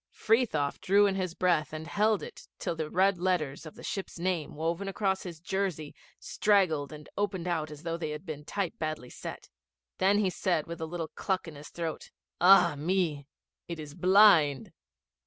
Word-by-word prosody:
Frithiof 215 - +1
drew 200 +2 +4
in 200 - +2
his 185 -3 -3
breath 175 -4 +1
and 155 0 -6
held 210 +4 +1
it - - -10
till 170 - -3
the 160 -1 -3
red 190 +1 +2
letters 165 -5 -1
of 155 - -11
the - - -12
ship's 195 -2 -5
name, 170 -4 -2
woven 165 +5 -2
across 195 -1 0
his 170 -4 -8
jersey, 180 -4 -3 0.3
straggled 180 -9 +1
and 150 -1 -10
opened 195 -4 -1
out 160 -3 -1
as 150 0 -11
though 165 0 -2
they 160 -2 -4
had 150 +4 -6
been 150 -3 -6
type 190 +2 -2
badly 155 -6 -4
set. - - -8 0.5
Then 195 +2 +4
he 200 -3 +2
said 175 -5 0
with 170 -1 -7
a 160 - -2
little 165 -1 -4
cluck 190 -3 -2
in 165 - -8
his 145 +1 -11
throat, 165 -2 -5 0.3
'Ah 180 -2 +7
me! 155 -2 -1 0.4
It 170 -2 -5
is 150 -2 -8
blind. 180 - +5
170 Hz, 185 wpm, -29 LUFS, 155-190 Hz, 0.5 s, Ah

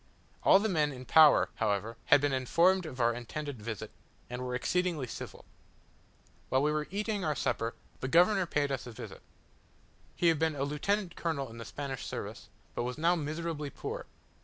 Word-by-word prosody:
All - - +7
the 210 +3 +1
men 155 -7 +1
in 130 -1 -9
power, 155 +2 +7
however, 105 +2 0
had 145 - +6
been 145 -1 +1
informed 170 +8 +3
of 130 -4 -8
our 120 0 +3
intended 125 +2 -6
visit, 110 -2 -5 0.4
and 125 +1 -4
were 125 0 -3
exceedingly 170 +2 0
civil. 120 - -8 1.0
While 130 +1 +2
we 150 - +3
were 150 0 -1
eating 205 0 -2
our 155 -2 0
supper, 115 -2 -1 0.2
the 130 - -3
governor 180 +5 +4
paid 145 -3 0
us 130 -2 -3
a - - -7
visit. 110 - -9 0.9
He 170 - +3
had 160 -3 +2
been 160 -1 +1
a 140 - -1
lieutenant 175 +6 -1
colonel 140 -7 -2
in 115 - -10
the 115 - -7
Spanish 135 -1 -5
service, - - -6 0.2
but 125 +2 -3
now 165 +3 +3
was 160 - -3
miserably 155 -2 -3
poor. 475 - -6
150 Hz, 185 wpm, -31 LUFS, 125-170 Hz, 1.0 s, All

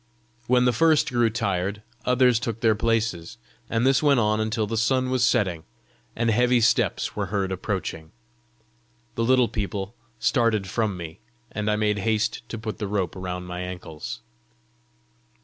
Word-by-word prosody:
When 125 0 +4
the 125 - +3
first 155 +5 +3
grew 120 -2 +3
tired, 100 -2 -2 0.2
others 125 -2 +4
took 115 -1 -4
their 115 -2 +4
places, 110 -6 -1 0.3
and 115 +2 +1
this 135 -1 +4
went 145 -4 +4
on 110 -1 +2
until 110 0 0
the 110 +2 -3
sun 130 +3 +1
was 130 -1 +1
setting, 100 -9 +1 0.5
and 115 0 +1
heavy 120 +2 +3
steps 115 - +1
were 100 -2 -2
heard 95 0 -1
approaching. 90 -4 -4 1.0
The 115 - -1
little 125 0 +4
people 100 -1 -4 0.2
started 115 -6 +1
from 105 0 -1
me, 80 -2 -8 0.3
and 105 0 -2
I 105 - +2
made 105 -1 +1
haste 110 +1 0
to 115 - -5
put 110 -1 -6
the 105 - -2
rope 95 -4 -2
round 90 -1 -5
my 90 0 -6
ankles. 90 -4 -6
110 Hz, 160 wpm, -25 LUFS, 95-120 Hz, 1.0 s, When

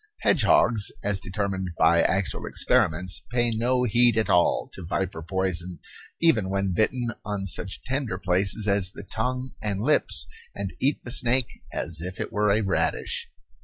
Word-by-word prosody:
Hedgehogs, 110 -4 +3
as 100 -1 +1
determined 95 0 -3
by 85 +1 +4
actual 95 0 -1
experiments, 90 +3 +1
pay 120 -1 +1
no 125 +3 +1
heed 120 0 +3
at 110 - +1
all 90 -1 +3
to 95 - -9
viper 85 -1 -3
poison 90 0 -1 0.4
even 115 - +3
when 100 -1 -1
bitten 120 +4 0
on 105 -2 -4
such 95 0 -4
tender 130 -6 -2
places 95 +3 +1
as 100 -2 +2
the - - -9
tongue 125 +6 -3
and 100 -2 -2
lips 150 +7 +1 0.3
and 100 -2 -4
eat 140 +3 0
the 120 - -5
snake 125 -1 +3 0.2
as 80 -1 +3
if 90 +2 -5
it - - -4
were 105 0 +1
a 105 +2 +2
radish. 95 -1 -1
100 Hz, 160 wpm, -25 LUFS, 95-120 Hz, 0.4 s, by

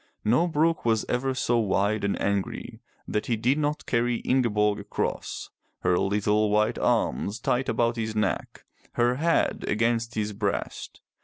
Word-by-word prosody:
No 125 +11 +3
brook 165 0 +1
was 115 -2 +1
ever 130 +1 -1
so 120 -2 +1
wide 105 0 +1
and 100 - 0
angry 100 -1 -2 0.3
that 105 - -2
he 120 - +1
did 125 +7 +1
not 150 0 -1
carry 120 0 +1
Ingeborg 105 -5 +2
across, 100 - -4 0.3
her 90 0 +2
little 105 +3 +1
white 105 +2 +2
arms 105 +2 0
tight 125 +3 0
about 120 0 +1
his 110 -1 -3
neck, 105 -3 -2 0.3
her 120 +1 +2
head 165 +3 +1
against 115 +2 0
his 105 -1 -1
breast. 100 -1 -3
115 Hz, 150 wpm, -26 LUFS, 105-125 Hz, 0.3 s, No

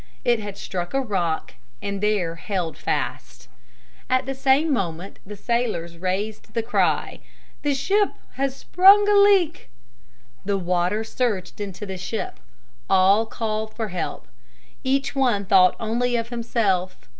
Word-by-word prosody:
It 240 -2 +3
had 205 -2 -7
struck 175 +3 -4
a - - +3
rock 170 - -2 0.3
and 200 +4 -4
there 205 -6 +1
held 170 -1 -3
fast. - - -4 0.6
At 255 0 +2
the 270 - -3
same 270 +3 +2
moment 180 -4 -3
the 210 - -7
sailors 200 -7 -2
raised 200 +6 -3
the 230 - 0
cry, 230 - 0 0.4
"The 290 -1 +1
ship 400 +9 +2 0.2
has 270 0 -1
sprung 395 +3 +6
a 415 - +4
leak!" 400 - +4 0.7
The 200 0 0
water 180 +3 0
surged 220 -4 -2
into 200 0 -5
the 190 -1 -6
ship. 215 +5 -4 0.5
All 195 +4 +4
called 220 -1 -3
for 220 -2 -3
help. 180 -2 -4 0.6
Each 270 +2 0
one 240 -7 +1
thought 185 -1 +5
only 240 +2 0
of 230 0 -2
himself. 220 -6 -1
215 Hz, 140 wpm, -23 LUFS, 185-255 Hz, 0.7 s, sprung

